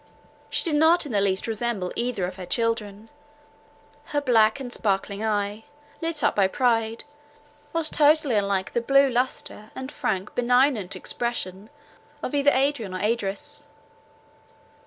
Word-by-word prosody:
She - - 0
did 305 -4 +1
not 330 +2 +5
in 285 - -6
the 205 -2 +2
least 190 -1 +1
resemble 225 -4 -2
either 235 -6 -1
of 180 +1 -6
her 185 - -6
children; 220 0 -2 0.9
her 290 - -1
black 235 -3 +3
and 250 -3 -6
sparkling 200 0 -1
eye, 210 0 -1 0.4
lit 330 -3 -1
up - - +2
by 195 -2 +4
pride, 225 0 0 0.7
was 330 -1 +1
totally 300 -3 +3
unlike 200 -2 0
the 235 - +1
blue 275 +3 +4
lustre, 245 -3 -2
and 260 +1 -6
frank, 200 -8 -2
benignant 245 -5 +2
expression 205 -1 -3 0.5
of - - -3
either 285 0 +4
Adrian 260 -8 0
or - - -3
Idris. 210 -2 -2
230 Hz, 140 wpm, -25 LUFS, 200-270 Hz, 0.9 s, not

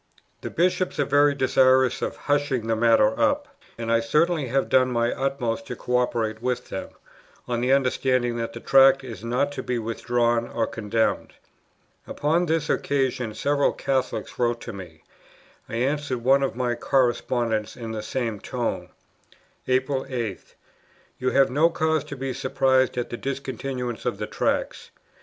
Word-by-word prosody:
"The - - -5
Bishops 180 0 0
are 145 - +3
very 145 +1 +4
desirous 130 -1 +3
of - - -2
hushing 145 -5 0
the 115 0 +1
matter 110 -1 +3
up: - - +2 0.3
and 115 0 -3
I 115 - +4
certainly 150 +5 +1
have 135 +3 0
done 130 -1 +3
my 120 0 +1
utmost 125 -4 -2
to - - -5
co 125 0 -1
operate 115 -3 -1
with 125 0 -2
them, 95 - -5 0.6
on 120 -1 -1
the 125 +2 +1
understanding 130 -2 +1
that 115 0 -3
the - - -8
Tract 135 0 +5
is 115 -5 -8
not 125 +5 0
to 140 -2 -5
be 125 -1 -2
withdrawn 120 +1 0
or 115 - -1
condemned." 115 0 -1 0.7
Upon 165 +4 0
this 160 -1 0
occasion 130 -5 -1
several 145 0 +1
Catholics 135 -2 -2
wrote 120 -1 +1
to 115 - -7
me; 85 -5 -11 0.7
I - - -5
answered 130 0 -1
one 135 +2 +4
of 135 -4 -1
my 125 -1 0
correspondents 120 -3 0
in 115 -2 -6
the 110 -1 -4
same 115 -1 -3
tone: - - -3 0.8
"April 130 +1 0
8. 115 -7 -5 0.6
You 130 - +1
have 135 -1 +3
no 155 +5 +4
cause 160 -3 0
to 145 - -7
be 135 -1 -4
surprised 130 0 +1
at 120 - -3
the 120 - -4
discontinuance 130 -3 -4
of - - -1
the - - -3
Tracts. - - -2
125 Hz, 160 wpm, -24 LUFS, 115-135 Hz, 0.8 s, Tract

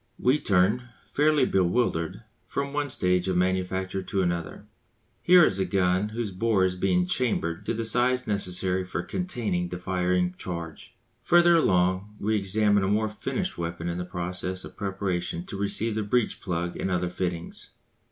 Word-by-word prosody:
We 130 +4 +2
turn, 105 +5 +2 0.2
fairly 150 0 +3
bewildered, 90 -1 0 0.2
from 140 0 -3
one 145 0 -1
stage 90 -6 +1
of 95 -1 +1
manufacture 95 +1 0
to 95 0 -1
another. 85 -2 -3 0.6
Here 180 -2 +7
is 100 - 0
a - - +2
gun 95 +1 +1
whose 110 -1 -3
bore 100 0 +2
is 90 -1 -1
being 90 -1 +1
"chambered" 90 -6 -1
to 115 - 0
the 115 0 -2
size 125 +3 +2
necessary 95 -3 -1
for 90 - -4
containing 110 - -2
the 90 - -5
firing 90 0 0
charge. 85 -3 -7 0.3
Further 175 +6 +5
along 95 - +2
we 110 +2 0
examine 105 +1 +3
a - - +1
more 105 +2 +1
finished 105 - -4
weapon 85 0 -4
in 85 +1 -2
process 90 +1 -4
of - - -11
preparation 95 -4 -3
to - - -7
receive 100 +3 0
the 110 - -1
breech 110 +3 0
plug 85 -2 -3
and - - -2
other 90 -1 -1
fittings. 90 -2 -4
95 Hz, 160 wpm, -26 LUFS, 90-110 Hz, 0.6 s, Here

